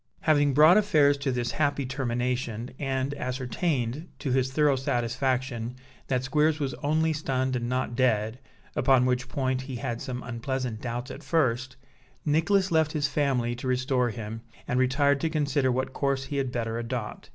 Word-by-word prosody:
Having 145 -3 +3
brought 155 +6 +8
affairs 150 -9 +4
to 140 -1 -1
this 120 -1 -1
happy 145 -2 0
termination, 125 -2 -2
and 135 0 -1
ascertained, 130 +2 -2
to 135 - -3
his 130 0 +1
thorough 145 0 +3
satisfaction, 125 -1 -1 0.3
that 130 -2 0
Squeers 150 +3 +2
was 135 -3 -1
only 155 +2 +2
stunned, 130 -3 -1
and 120 -1 -2
not 125 -2 -1
dead 115 -2 +1 0.4
(upon 130 -2 +4
which 125 0 0
point 130 -3 -1
he 130 0 -6
had 115 0 -3
some 125 -1 -5
unpleasant 120 -1 -3
doubts 120 +2 -4
at 140 - -8
first), 130 -5 0 0.5
Nicholas 185 +6 +2
left 160 -2 +2
his 145 -2 +1
family 135 -5 0
to 120 +2 -6
restore 130 -1 +1
him, 110 0 -6 0.3
and 125 - +1
retired 140 +2 +3
to 165 - +1
consider 145 -4 +1
what 130 +1 -1
course 140 -1 0
he 140 +1 -4
had 135 -2 -1
better 115 -2 -2
adopt. 120 -2 -5
130 Hz, 165 wpm, -27 LUFS, 125-145 Hz, 0.5 s, brought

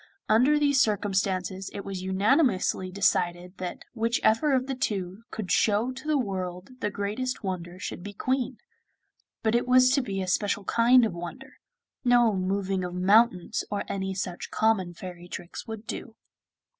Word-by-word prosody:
Under 255 +7 +4
these 285 -2 +3
circumstances 195 -2 0
it 200 - -6
was 195 -2 -5
unanimously 190 - +2
decided 180 -1 0
that 180 -1 -5
whichever 230 +4 +2
of 255 0 +1
the 270 - -3
two 195 -5 -3
could 215 -4 -5
show 220 +4 +2
to 265 +4 -9
the 305 -1 +3
world 185 -3 -4
the 210 - -1
greatest 210 +6 -3
wonder 180 -2 -4
should 185 - -6
be 205 +3 -7
Queen; 255 +4 -1 0.9
but 220 0 +2
it 240 +1 +1
was 255 0 +6
to 275 +1 +3
be 195 -6 -4
a 185 - -2
special 200 +2 0
kind 235 +4 +5
of 215 - -2
wonder, 170 -1 -8 0.4
no 240 -4 +4
moving 190 0 -1
of 180 0 -4
mountains 190 0 +3
or 205 - -2
any 190 -1 -3
such 180 -2 -4
common 195 -6 +1
fairy 175 -1 -9
tricks 175 0 -8
would 220 -1 -7
do. 225 0 -6
200 Hz, 160 wpm, -27 LUFS, 185-240 Hz, 0.9 s, was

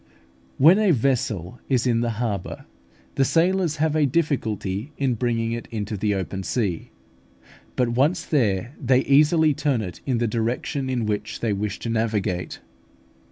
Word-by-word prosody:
When 165 +9 +6
a 215 -2 +3
vessel 120 - 0
is 130 -2 +2
in 120 -2 +2
the 120 - 0
harbour, 105 -6 -3 0.5
the 135 - +2
sailors 170 +2 +2
have 155 0 0
a 150 -2 +3
difficulty 125 - -1
in 135 -3 +1
bringing 115 -1 -1
it 120 0 -4
into 110 -1 -4
the 105 +1 0
open 95 0 -3
sea; 95 -4 -2 0.9
but 125 -2 +1
once 145 +8 +1
there, 115 - 0
they 130 0 +4
easily 150 +3 +4
turn 135 -5 0
it 90 -3 -8
in 130 -3 +1
the 120 - 0
direction 120 +5 -2
in 125 -3 -1
which 105 -1 -3
they 115 -3 0
wish 100 0 -3
to 115 - -4
navigate. 105 -5 -2
120 Hz, 160 wpm, -23 LUFS, 105-140 Hz, 0.9 s, When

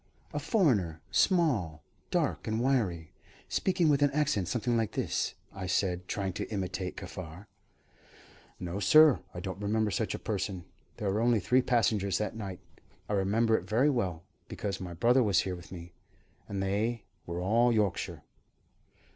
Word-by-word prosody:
"A - - -1
foreigner. 105 - +1
Small, 120 - +2 0.3
dark, - - -1
and 110 +1 0
wiry, 105 - 0 0.4
speaking 185 -3 +1
with 145 -2 +3
an 145 - +5
accent 145 - +1
something 120 0 0
like 110 -2 0
this," - - -1 0.2
I 95 -1 -5
said, 90 -2 0
trying 95 -3 -2
to - - -4
imitate 95 -3 -3
Kaffar. 90 0 -8 1.1
"No, 90 +2 -4
sir, 155 +4 +6 0.2
I - - -4
don't 95 +2 -6
remember 105 +1 +1
such 105 +3 -1
a - - -4
person. 95 -4 -3 0.3
There 100 -2 -1
were 105 - 0
only 120 -1 +3
three 125 +7 +3
passengers 110 -6 +1
that 105 +1 -3
night 100 -5 -6 0.5
I - - -2
remember 110 +4 +2
it 90 -3 -3
very 125 +8 +3
well, 90 - -2 0.2
because 100 -2 -4
my 90 -2 -6
brother 120 +9 +4
was 100 -5 +3
here 95 -1 -3
with 85 - -12
me 85 -1 -9 0.6
and 100 -1 -2
they 105 +4 -1 0.2
were 85 0 -3
all 115 +7 +3
Yorkshire." 105 -4 -1
100 Hz, 160 wpm, -30 LUFS, 90-120 Hz, 1.1 s, sir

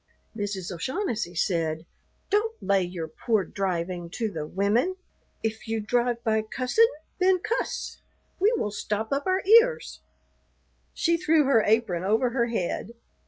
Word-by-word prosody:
Mrs. 200 -4 -3
O'Shaughnessy 215 - -3
said, 160 -2 0 0.5
"Don't 440 +2 +1
lay 195 0 +3
your 175 -2 -4
poor 225 -1 0
driving 175 -3 -3
to 225 -3 -1
the 155 -4 -5
women. 210 - +1 0.5
If 220 0 -3
you 225 0 -1
drive 240 +2 0
by 220 -2 +2
cussin', 255 - +2 0.3
then 370 0 +4
cuss. 470 +7 -3 0.4
We 405 +4 +4
will 210 - -1
stop 215 +3 -2
up 280 +3 -1
our 375 +1 +1 0.2
ears." 475 0 -5 1.0
She 335 0 +2
threw 320 -2 +3
her 270 -5 +4
apron 210 -6 +1
over 225 +5 +2
her 235 -1 +1
head. 225 0 -3
225 Hz, 140 wpm, -26 LUFS, 190-280 Hz, 1.0 s, then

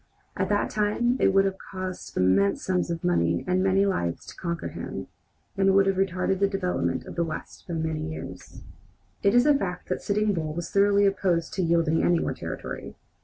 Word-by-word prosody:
At - - -1
that 205 0 +1
time 215 +4 +1
it - - +4
would 195 0 +4
have 190 0 -2
cost 185 -1 -7
immense 95 +2 +3
sums 180 -1 0
of 170 0 -3
money 85 - +1
and 180 0 +1
many 195 +1 +3
lives 85 - -1
to - - -11
conquer 170 -1 -3
him, - - -6 0.5
and 195 -1 +3
would 195 0 +5
have 195 -1 +1
retarded 190 0 0
the 200 - +4
development 195 -2 -1
of - - -8
the 170 - 0
West 160 -2 -7
by 170 - -3
many 160 -1 -2
years. 155 - -9 0.6
It 200 +3 +3
is 245 +2 +6
a 295 - +6
fact 190 -10 -3
that - - -1
Sitting 210 0 +1
Bull 155 -3 -3
was 170 0 -5
thoroughly 200 0 +4
opposed 180 -4 +1
to 190 - -1
yielding 165 -2 +2
any 175 - +4
more - - -1
territory. - - -6
185 Hz, 200 wpm, -26 LUFS, 165-195 Hz, 0.6 s, is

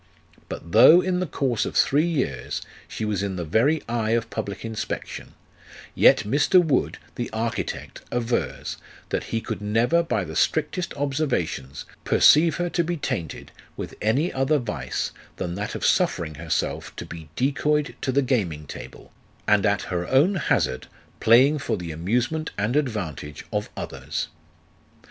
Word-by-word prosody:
But 85 - -7
though 120 - +8
in 185 -1 0
the 185 - -1
course 130 -6 0
of - - -4
three 150 +5 +3
years 155 -6 -2 0.2
she 110 - -4
was 105 -3 -1
in 100 -2 -2
the 85 -2 -3
very 125 - +2
eye 115 -1 0
of 115 -1 -4
public 100 +2 -4
inspection, 110 -1 -5 0.6
yet - - +5
Mr. 145 - +4
Wood, 155 -7 +1 0.2
the 120 - -4
architect, 115 +1 -4
avers, 120 0 -2 0.3
that - - -2
he 115 - -2
could - - -5
never, 115 +11 +2
by 130 - -1
the 80 -2 -7
strictest 160 - 0
observations, 135 - -2 0.2
perceive 160 +1 +5
her 175 0 -1
to 170 0 0
be 170 +1 -2
tainted 115 - -4 0.3
with - - -5
any 135 - +1
other 135 +3 +2
vice 75 - -3 0.2
than 90 -2 -3
that 100 +3 -4
of - - -2
suffering 80 -2 +2
herself 80 0 -3
to - - -6
be 80 -2 -9
decoyed 150 +3 +1
to 130 - 0
the 140 +2 +2
gaming 95 - -1
table, - - -10 0.4
and 105 -1 +4
at 100 0 +1
her 90 -1 -3
own 145 +9 +4
hazard 65 - 0 0.3
playing 130 +7 +5
for 115 -5 -1
the 85 -2 -5
amusement 120 - -1
and 105 +5 0
advantage 95 - -2
of - - -1
others. - - -4
115 Hz, 155 wpm, -24 LUFS, 95-150 Hz, 0.6 s, though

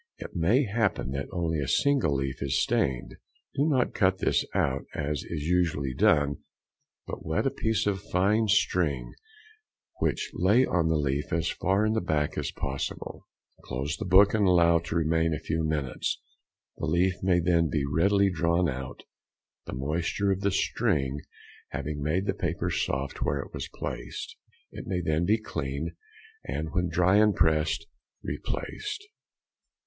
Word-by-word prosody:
It - - -9
may 95 - +3
happen 105 - 0
that 70 0 -3
only 85 -4 -1
a 70 - -2
single 140 - +2
leaf 65 0 -3
is 70 -1 +1
stained; 65 -2 0 0.4
do 145 +3 +1
not 130 -4 +2
cut 95 -2 +2
this - - +1
out 70 0 +1
as 75 -1 -2
is 75 -3 -4
usually 80 -5 +1
done, 70 +2 +3 0.7
but - - -7
wet 80 - -1
a 135 - +2
piece 110 -5 0
of 100 -2 0
fine 105 +4 +2
string, 80 - +1 0.9
which - - -1
lay 105 +9 +4
on 85 -2 +1
the 80 - +2
leaf 70 0 -1
as 85 0 0
far 95 +3 +1
in 110 - +1
the 110 - +1
back 75 -4 0
as - - -2
possible; 70 0 -5 0.4
close 70 +5 -3
the 110 - -4
book 95 +2 +6
and 105 -3 +3
allow 85 -2 +5
to 85 0 -5
remain 80 0 +2
a - - -5
few 80 +1 -2
minutes; 75 -4 -1 0.6
the 80 - -3
leaf 90 +3 +1
may 90 -2 +3
then 85 -2 +2
be 75 -3 0
readily 100 +7 +3
drawn 85 +1 +2
out, 65 -2 -5 0.6
the - - -5
moisture 80 +9 0
of 95 0 -1
the 100 - +2
string 70 -7 0 0.5
having 75 +1 -4
made 80 +7 0
the 95 - 0
paper 90 -1 -2
soft 70 -3 -2
where 70 - +1
it 70 - -6
was - - -5
placed. - - -5 0.4
It - - -8
may 90 -2 -1
then 80 0 +1
be 105 +4 +3
cleaned, 75 -6 -4 0.5
and 75 +5 -4
when 90 -2 0
dry 90 +4 +3
and 105 -2 +4
pressed, 80 +4 +2 0.4
replaced. 405 - -4
85 Hz, 165 wpm, -28 LUFS, 75-95 Hz, 0.9 s, book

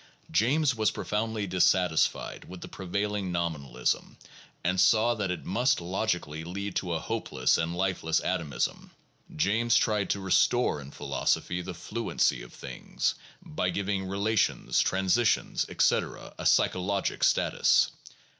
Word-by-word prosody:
James 135 - +3
was 110 -2 +1
profoundly 110 0 -2
dissatisfied 90 -2 +1
with 90 -1 -10
the - - -7
prevailing 100 +1 -3
nominalism, 75 -8 -2 0.5
and 90 +2 +2
saw 115 +2 +4
that 105 -4 -2
it 90 - -4
must 120 +7 +2
logically 85 -4 -2
lead 100 +3 -5
to 90 -3 -1
a 80 - -1
hopeless - - 0
and 80 +1 -1
lifeless 90 -3 0
atomism. 80 -8 -2 0.5
James 110 +7 +2
tried 105 -3 +2
to 100 - 0
re 95 -1 -5
store 120 -11 +3
in 70 - -10
philosophy 90 +4 -1
the 90 0 -7
fluency 100 - -1
of - - -11
things, - - -3 0.3
by 90 +4 -2
giving 95 0 -2
relations, 100 +2 +1
transi 95 +5 +2
tions, 115 - +1
etc., - - 0
a - - -1
psychologic 95 +1 +1
status. - - +3
95 Hz, 135 wpm, -28 LUFS, 85-105 Hz, 0.5 s, saw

